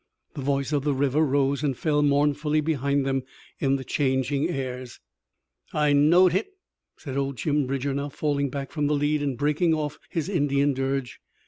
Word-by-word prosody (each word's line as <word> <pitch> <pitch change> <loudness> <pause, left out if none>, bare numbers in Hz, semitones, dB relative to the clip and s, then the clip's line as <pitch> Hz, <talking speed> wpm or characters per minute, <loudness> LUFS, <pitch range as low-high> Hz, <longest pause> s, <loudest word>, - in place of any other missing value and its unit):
The 140 - -6
voice 140 +1 -1
of 145 -2 +1
the 145 -2 +1
river 140 +2 +1
rose 140 -1 +1
and 140 -5 -1
fell 150 -2 +1
mournfully 150 +1 +2
behind 140 -2 0
them 135 -1 0 0.4
in 135 -1 +2
the 135 - -4
changing 135 +2 0
airs. 130 -5 -5 0.7
"I 150 -1 +2
knowed 170 +6 +5
hit!" 210 - -2 0.4
said 135 -3 -6
old 140 -1 -2
Jim 145 -2 0
Bridger, 135 +1 -2
now 140 +1 -3
falling 140 -1 -1
back 135 0 -5
from 150 -2 -1
the 150 - +2
lead 145 +1 +1
and 140 -4 -2
breaking 150 +3 +2
oft' 150 -1 -4
his 165 -2 -2
Indian 145 -6 +1
dirge. 135 -1 -2
145 Hz, 180 wpm, -25 LUFS, 135-150 Hz, 0.7 s, knowed